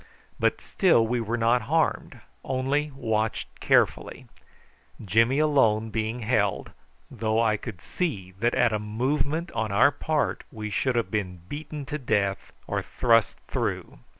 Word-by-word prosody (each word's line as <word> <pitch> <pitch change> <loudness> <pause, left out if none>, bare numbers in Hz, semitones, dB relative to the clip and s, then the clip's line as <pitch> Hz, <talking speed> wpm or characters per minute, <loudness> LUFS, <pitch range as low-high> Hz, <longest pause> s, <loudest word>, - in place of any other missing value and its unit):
But - - +1
still 165 - +3
we 120 +1 -1
were 115 +2 -2
not 120 +2 +3
harmed, 160 +1 -1 0.2
only 135 +3 0
watched 110 -4 -2
carefully, - - +1 0.8
Jimmy 115 +7 +3
alone 115 -8 +3
being 110 +2 -2
held, 105 -3 0 0.4
though 110 0 0
I 110 -2 +3
could 105 -4 -8
see 105 - -3
that 120 +2 +1
at 120 -3 +3
a 105 - 0
movement 140 +10 -1
on 110 -2 -2
our 120 +8 +5
part 150 +1 -1
we 110 -3 -6
should 130 +4 0
have 115 -5 0
been 90 -5 -3
beaten 150 +2 -6
to 150 +2 -4
death 100 -6 -1
or - - -2
thrust 115 -3 +2
through. - - -3
115 Hz, 145 wpm, -26 LUFS, 110-140 Hz, 0.8 s, our